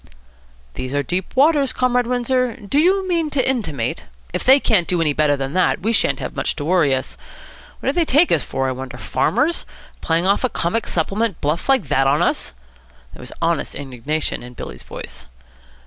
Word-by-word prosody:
"These 130 +2 -5
are 145 - +1
deep 180 - -3
waters, 285 0 +4
Comrade 250 -1 +1
Windsor. 250 0 0
Do 245 +4 -1
you 375 +4 +3
mean 335 -4 0
to 275 -3 0
intimate 205 - -2
?" 60 +2 -28
"If - - -2
they 265 +2 +6
can't 200 -10 +3
do 180 - +1
any 155 -3 +2
better 145 -1 +2
than 135 +1 -4
that, 185 -1 +2
we 225 +5 0
shan't - - +2
have - - -6
much - - -1
to 145 - -5
worry 160 -5 +3
us. 130 - -5 0.6
What - - 0
do - - +1
they 345 - +2
take 310 +3 +3
us - - +3
for, 135 0 -2
I - - 0
wonder? 130 -1 -7
Farmers? 295 - 0 0.4
Playing 165 +2 0
off 200 +5 +2
a 255 - +2
comic 210 +5 -1
supplement 195 +4 -1
bluff 150 - -2
like 260 - +3
that 135 0 +3
on 140 +2 +3
us!" 65 - -1 0.6
There - - -12
was - - -8
honest - - 0
indignation 140 +3 -3
in 125 0 -11
Billy's - - -8
voice. - - -8
185 Hz, 200 wpm, -20 LUFS, -, 0.6 s, they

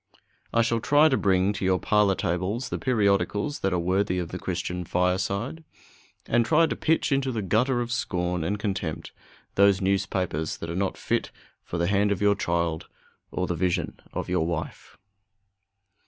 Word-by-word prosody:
I 115 - +3
shall 115 0 +1
try 145 +6 +5
to 135 - +2
bring 95 -2 +2
to 105 - -5
your 95 0 +3
parlor 105 0 +2
tables 95 +10 -2
the - - -3
periodicals 105 +2 +1
that 95 - 0
are 90 - +1
worthy 90 +2 +1
of 90 -2 -3
the 90 - -6
Christian 90 0 -3
fireside, 95 - -1 0.6
and 120 0 +2
try 155 +7 +4
to - - -2
pitch 160 -1 +1
into 135 -1 +1
the 110 -4 -3
gutter 120 +6 +2
of 120 0 -4
scorn 90 -7 -1
and 100 +6 -1
contempt 95 -6 -3 0.4
those 100 -1 +4
newspapers 95 -5 -1
that 85 - -6
are - - -4
not 95 +1 -1
fit - - -1 0.3
for 85 - -5
the 85 - +1
hand 100 +2 +2
of 100 - 0
your 105 0 +4
child 85 -4 -1 0.4
or 90 - -2
the 90 - -1
vision 90 +1 -1
of - - -4
your 90 -3 0
wife. 80 -1 -5
95 Hz, 175 wpm, -26 LUFS, 90-110 Hz, 0.6 s, try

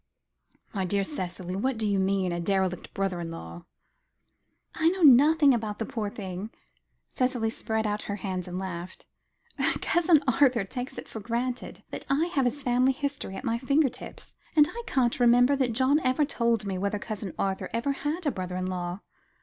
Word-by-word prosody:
"My 195 -3 -1
dear 195 +2 0
Cicely, 185 - -5
what 255 +5 -1
do 220 - -1
you 200 -2 +1
mean 190 -1 +1
a 175 - -2
derelict 190 0 -1
brother 195 -2 -2
in 170 -1 -4
law?" 85 - -9 1.1
"I 320 +1 +3
know 370 0 -2
nothing 290 +1 +7
about 215 -3 -2
the 225 - -2
poor 210 -2 -3
thing," 195 0 -6 0.6
Cicely 250 -4 0
spread 220 0 -2
out 210 0 -1
her 200 - -1
hands, 185 -3 -4
and 180 0 -5
laughed. 185 -1 -6 0.7
"Cousin 335 -3 +3
Arthur 255 -3 +4
takes 245 +6 -6
it - - -7
for 220 - -7
granted 240 +3 -3
that - - -6
I 285 +4 +2
have 275 -3 +2
his 275 +3 -1
family 255 +2 +3
history 280 -7 -4
at - - -6
my 230 -2 0
finger 275 +3 +3
ends, - - -11 0.2
and 300 -1 +7
I 475 - -6
can't 245 -2 +1
remember 245 +3 +5
that 255 -4 +1
John 265 +5 +3
ever 260 +1 +2
told 235 -5 0
me 190 -2 -2
whether 200 +2 -1
Cousin 205 -3 -5
Arthur 195 -1 -2
ever 235 +5 0
had 295 +5 -3
a 290 - +2
brother 185 -4 -5
in 185 0 -2
law. 180 +1 -4
225 Hz, 185 wpm, -27 LUFS, 190-265 Hz, 1.1 s, nothing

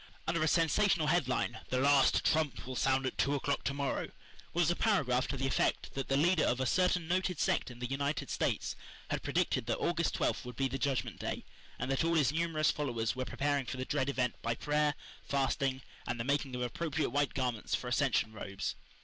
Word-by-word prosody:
Under 165 -1 0
a 155 - +3
sensational 165 +1 +3
headline, 150 -5 +1
"The 130 - 0
Last 140 0 +4
Trump 155 -3 +1
will 130 0 -5
sound 135 +1 +2
at 130 - -3
Two 140 +1 +2
O'clock 140 0 -1
To 140 - 0
morrow," 140 -1 -2 0.4
was 175 -1 +2
a - - 0
paragraph 140 - +2
to 135 - -3
the 135 - -1
effect 135 - 0
that 135 -1 -3
the 135 - +2
leader 170 +2 +4
of 125 - +1
a 130 - +1
certain 180 +2 +2
noted 180 -2 0
sect - - +1
in 120 - -10
the 125 - -4
United 140 +3 -2
States - - -1 0.4
had - - -1
predicted 110 - 0
that 115 - 0
August 170 -1 0
twelfth - - 0
would 125 -1 -8
be 135 +2 +1
the 135 +1 -4
Judgment 130 -5 -1
Day, - - -4 0.3
and 125 +2 -2
that 135 - +1
all 165 0 +2
his 145 -5 +4
numerous 160 -2 +2
followers 120 -7 -1
were 130 0 -2
preparing 140 -1 -1
for 130 - -4
the 130 - -3
dread 135 +1 0
event 125 -3 0
by 115 0 -1
prayer, 150 +1 +1 0.3
fasting, 135 -1 0 0.2
and 120 - -2
the - - 0
making 140 0 0
of 125 - -2
appropriate 155 +4 -2
white 145 0 0
garments 125 -5 -1
for 125 - -5
ascension 125 -4 +1
robes. 100 -2 -4
140 Hz, 210 wpm, -33 LUFS, 130-155 Hz, 0.4 s, Last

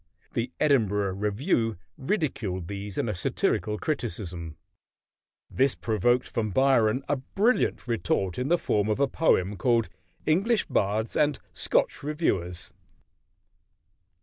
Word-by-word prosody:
The 120 +1 -2
Edinburgh 105 -9 +2
Review 105 - 0 0.2
ridiculed 120 - -2
these 100 0 -6
in - - 0
a 105 - -1
satirical 105 +4 0
criticism. 90 - -4 0.9
This 135 0 +1
provoked 120 +3 +1
from 110 -2 -2
Byron 130 +1 +3
a 145 - +1
brilliant 200 - 0
retort 95 -3 -1
in 125 - -1
the 175 +3 +4
form 105 -9 0
of 105 - 0
a 140 - +3
poem 105 - +1
called 115 -7 +2 0.4
"English 200 +8 +2
Bards 105 +3 0
and 150 -1 +2 0.2
Scotch - - +1
Reviewers." 140 - -2
115 Hz, 120 wpm, -27 LUFS, 100-140 Hz, 0.9 s, the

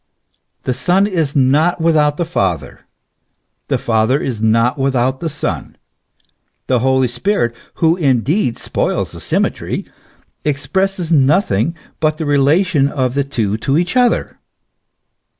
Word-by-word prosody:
The 130 - -1
Son 180 +9 +2
is 165 -8 -1
not 145 +6 +3
without 150 -3 +2
the 170 - -1
Father, 85 - -3 0.8
the - - +1
Father 115 +5 +1
not 115 +3 +2
without 130 -1 0
the 165 - -3
Son; 150 - -4 0.9
the 125 -2 +1
Holy 130 +1 +2
Spirit, 120 - -1 0.2
who 165 0 +2
indeed 135 - +1
spoils - - -2
the - - -8
symmetry, - - -1 0.6
expresses 170 +5 -1
nothing 145 - +2 0.2
but 155 -1 +1
the 160 - -3
relation 145 +2 +2
of 130 -3 -1
the 140 +1 +1
two 110 -7 -2
to 135 +6 0
each 180 +5 -1
other. 245 -2 +1
140 Hz, 125 wpm, -17 LUFS, 130-165 Hz, 0.9 s, not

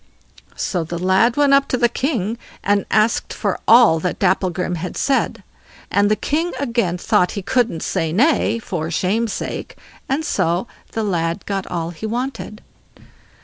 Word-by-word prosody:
So 180 -4 -1
the 170 +2 -5
lad 190 +8 +2
went 285 -1 +4
up 275 0 +4
to 255 - 0
the 240 -1 +4
king 235 - -2 0.2
and 200 0 +1
asked 215 +2 +2
for - - -2
all 230 -8 +7
that 180 +2 -2
Dapplegrim 180 -1 0
had 180 +3 -5
said, 275 -1 0 0.5
and 200 0 +3
the 215 - +3
king 325 +9 -1
again 235 -10 0
thought 180 0 +1
he 200 - -4
couldn't 230 -5 0
say 160 -1 -1
nay, 230 - +2
for 170 -8 -4
shame's 205 +7 0
sake, - - -5 0.3
and 295 +4 0
so 175 - 0 0.3
the 225 - -1
lad 170 -2 -1
got 195 -1 -3
all 170 -1 -3
he 175 +6 -6
wanted. 240 -2 -4
205 Hz, 160 wpm, -20 LUFS, 180-240 Hz, 0.5 s, all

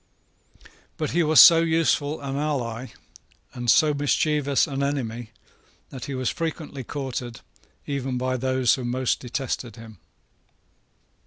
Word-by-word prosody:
But - - -2
he 175 - +2
was 155 -1 +4
so 165 -1 +10
useful 160 -2 +1
an 135 -1 -4
ally, 130 -5 -3 0.7
and 120 -1 -3
so 150 +4 +5
mischievous 145 0 +1
an 140 -1 -4
enemy 120 -5 -3 0.6
that 130 -3 -7
he 140 - -5
was 130 -2 -1
frequently 155 -4 -5
courted 125 -3 -5 0.4
even 135 -2 -3
by 130 +1 -1
those 130 -1 +1
who 130 - -3
most 125 +1 -1
detested 125 -2 -4
him. 110 -4 -13
135 Hz, 130 wpm, -24 LUFS, 125-145 Hz, 0.7 s, so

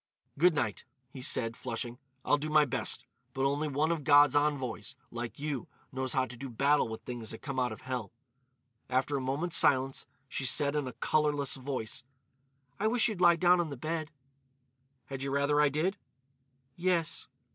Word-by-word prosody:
"Good 170 +2 +4
night," 120 -8 -1 0.3
he 130 - -9
said, 115 -2 0
flushing; 120 0 -4 0.3
"I'll 145 - +3
do 155 +2 -3
my 155 -1 +5
best. 120 -1 -2 0.3
But 135 0 +1
only 145 +3 +1
one 150 +3 +1
of 165 -3 -2
God's 145 0 +6
envoys, 135 -5 0 0.2
like 120 0 -5
you, 145 -4 -3 0.2
knows 130 -1 -3
how 130 -1 +2
to 125 - -10
do 135 +3 -7
battle 140 +4 +2
with 110 - -7
things 120 -3 -6
that 110 - -7
come 135 -2 -3
out 125 -2 +1
of 110 - -8
hell." 125 -6 -4 0.8
After 130 +3 +1
a 135 - -1
moment's 140 +7 +1
silence 135 -1 +3 0.2
she 130 - -3
said 140 +3 +3
in 145 -3 -1
a 125 - -6
colourless 145 0 +1
voice: 130 -4 -4 0.8
"I 215 - +2
wish 235 +1 +3
you'd 200 -5 -5
lie 175 -1 +7
down 180 +1 +4
on 165 - -3
the 140 - -6
bed." 155 +3 -3 1.0
"Had 135 0 -6
you 135 - -2
rather 140 +2 +2
I 150 - +5
did?" 165 +8 0 0.8
"Yes." 175 -2 0
140 Hz, 180 wpm, -31 LUFS, 130-150 Hz, 1.0 s, lie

